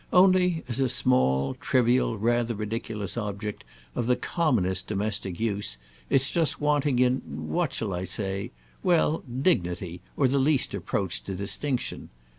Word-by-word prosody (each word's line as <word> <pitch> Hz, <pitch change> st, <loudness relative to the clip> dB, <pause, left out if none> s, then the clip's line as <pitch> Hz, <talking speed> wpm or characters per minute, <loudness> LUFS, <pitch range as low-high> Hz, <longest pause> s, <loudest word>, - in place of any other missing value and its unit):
Only, 180 Hz, -2 st, +4 dB
as 120 Hz, +1 st, -2 dB
a 130 Hz, -2 st, +2 dB
small, 70 Hz, -, +2 dB
trivial, 125 Hz, -2 st, +2 dB
rather 120 Hz, +2 st, +1 dB
ridiculous 105 Hz, -1 st, -4 dB
object 105 Hz, -1 st, -4 dB, 0.3 s
of 120 Hz, -, -2 dB
the 125 Hz, -, +4 dB
commonest 105 Hz, -, 0 dB
domestic 100 Hz, -3 st, -2 dB
use, 100 Hz, -, -2 dB, 0.3 s
it's 135 Hz, +1 st, +3 dB
just 165 Hz, -3 st, +1 dB
wanting 145 Hz, -2 st, +2 dB
in—what 80 Hz, -, 0 dB
shall 105 Hz, -4 st, -2 dB
I 90 Hz, +1 st, -3 dB
say? 95 Hz, +1 st, -2 dB, 0.3 s
Well, 165 Hz, -3 st, +3 dB
dignity, 90 Hz, -, -1 dB, 0.2 s
or 135 Hz, -, +4 dB
the 140 Hz, +2 st, +2 dB
least 140 Hz, 0 st, +2 dB
approach -, -, -2 dB
to 95 Hz, -, -4 dB
distinction. 125 Hz, +7 st, -1 dB
115 Hz, 135 wpm, -27 LUFS, 95-135 Hz, 0.3 s, Only